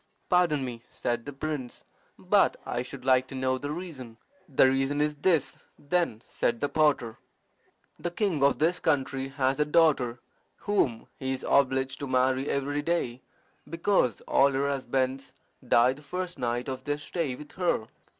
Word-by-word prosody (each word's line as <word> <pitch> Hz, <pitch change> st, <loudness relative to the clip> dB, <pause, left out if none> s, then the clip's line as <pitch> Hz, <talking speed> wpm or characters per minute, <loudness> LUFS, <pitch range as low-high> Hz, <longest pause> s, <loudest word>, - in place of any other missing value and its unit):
"Pardon 170 Hz, -7 st, +3 dB
me," 120 Hz, -2 st, -6 dB
said 120 Hz, +1 st, -3 dB
the -, -, -4 dB
prince, 140 Hz, -3 st, -5 dB, 0.3 s
"but -, -, +3 dB
I 120 Hz, -, -2 dB
should 130 Hz, +1 st, -9 dB
like 130 Hz, -1 st, +4 dB
to 135 Hz, -, -8 dB
know 130 Hz, 0 st, 0 dB
the 145 Hz, -, -5 dB
reason." 145 Hz, -9 st, -7 dB, 0.3 s
"The 135 Hz, -1 st, +5 dB
reason 135 Hz, +2 st, +1 dB
is 150 Hz, 0 st, +1 dB
this, 160 Hz, 0 st, +1 dB, 0.2 s
then," 145 Hz, -7 st, -1 dB
said 120 Hz, -1 st, -1 dB
the 145 Hz, -, -1 dB
potter. 145 Hz, -7 st, +1 dB, 0.8 s
"The 175 Hz, -, -2 dB
king 175 Hz, -5 st, -1 dB
of 140 Hz, 0 st, +4 dB
this 170 Hz, +4 st, +2 dB
country 135 Hz, -3 st, 0 dB
has 135 Hz, 0 st, 0 dB
a -, -, +5 dB
daughter 150 Hz, -6 st, +3 dB, 0.5 s
whom 140 Hz, -, +1 dB
he 130 Hz, -1 st, -1 dB
is 130 Hz, -, -5 dB
obliged 135 Hz, -1 st, +2 dB
to 140 Hz, -, -4 dB
marry 130 Hz, +1 st, +1 dB
every 145 Hz, +1 st, -1 dB
day, 145 Hz, -6 st, -1 dB, 0.5 s
because 165 Hz, -, +1 dB
all 140 Hz, +1 st, +3 dB
her 140 Hz, +1 st, +1 dB
husbands 135 Hz, -1 st, -2 dB, 0.3 s
die 120 Hz, +2 st, +5 dB
the 140 Hz, -, -14 dB
first 180 Hz, +2 st, -5 dB
night 120 Hz, 0 st, -1 dB
of 130 Hz, -1 st, -5 dB
their 145 Hz, +1 st, -1 dB
stay 150 Hz, -2 st, -3 dB
with 150 Hz, +2 st, -11 dB
her. 175 Hz, -11 st, 0 dB
135 Hz, 165 wpm, -28 LUFS, 130-150 Hz, 0.8 s, The